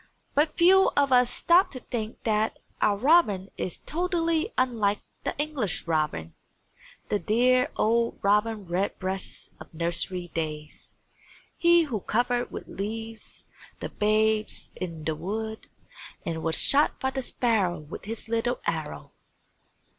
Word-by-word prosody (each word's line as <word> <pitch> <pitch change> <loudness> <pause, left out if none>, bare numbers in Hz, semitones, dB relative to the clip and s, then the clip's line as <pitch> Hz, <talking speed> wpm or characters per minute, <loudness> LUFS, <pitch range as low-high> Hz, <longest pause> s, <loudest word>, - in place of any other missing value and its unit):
But 300 +2 +1
few 380 +3 +6
of 280 -1 +3
us 250 -1 +5
stop 345 +9 +4
to 255 - -7
think 230 -2 -5
that 220 0 +1 0.2
our 205 -1 +3
robin 215 - +3
is 180 - -4
totally 335 - 0
unlike 220 -5 +1 0.2
the - - -3
English 290 - -1
robin, 150 - -1 0.8
the 205 - +1
dear 250 +4 +3
old 230 +1 +1
Robin 210 +1 +2
Redbreast 190 +1 -3
of - - -12
nursery 175 +2 -1
days; 155 -2 -5 0.6
he 340 0 +5
who 250 -9 -3
covered 245 +4 0
with - - -8
leaves 225 +2 -6 0.4
the - - -4
Babes 215 0 +1
in 165 -4 -6
the 160 - 0
Wood 220 +7 -5 0.6
and 160 -1 -3
was 160 0 0
shot 285 +2 +4
by 265 +1 -1
the 265 - -3
Sparrow 220 -8 0
with 150 +5 -9
his 225 +2 -6
little 230 +2 0
arrow! 155 - -3
220 Hz, 130 wpm, -27 LUFS, 185-255 Hz, 0.8 s, few